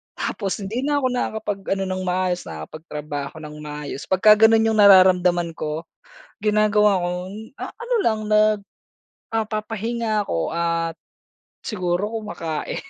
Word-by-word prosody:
Tapos 200 0 -3
hindi 215 +5 -3
na 290 +3 0
ako 260 - +1
nakakapag 220 -4 -2 0.2
ano 195 - -2
ng 185 0 -2
maayos, 180 0 0
nakapagtrabaho 145 - -6
ng 150 0 -8
maayos. 150 -1 -7
'Pagka 190 +3 +5 0.2
gano'n 225 0 +4
'yong 220 -1 +1
nararamdaman 180 -3 +6
ko, 155 +1 -3 0.6
ginagawa 210 -1 +3
ko, - - 0 0.5
ah, - - -5
ano 480 +1 -3
lang, 220 - +1
nag 215 0 +4 0.7
ah, 225 - +2
papahinga 220 +1 -2
ako 85 - -2
at 170 -1 -1 0.7
siguro 185 -1 -1
kumakain. 165 -7 -4
195 Hz, 130 wpm, -22 LUFS, 165-215 Hz, 0.7 s, nararamdaman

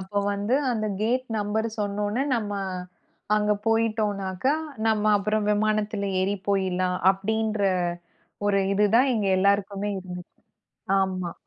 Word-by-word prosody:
அப்போ 190 +2 -3
வந்து 205 +5 0 0.2
அந்த 215 -2 -1 0.2
கேட் 250 +4 0
நம்பர் 215 +2 -1
சொன்னோன்னே 205 +4 -1
நம்ம 210 -3 -3 0.8
அங்க 210 0 +2
போயிட்டோன்னாக்க 215 -3 0 0.4
நம்ம 215 -1 +2
அப்புறம் 210 +1 0
விமானத்துல 210 -1 0
ஏறிப் 195 0 -1
போயிலாம் 185 -2 +1
அப்டின்ற 215 +2 -1 0.8
ஒரு 200 -1 +3 0.2
இது 210 +1 +4
தான் 260 +2 +4
எங்க 210 -3 0
எல்லாருக்குமே 200 +1 +1
இருந்துச்சு. 180 -1 -9 0.6
ஆமா. 185 -2 -1
205 Hz, 115 wpm, -25 LUFS, 195-215 Hz, 0.8 s, இது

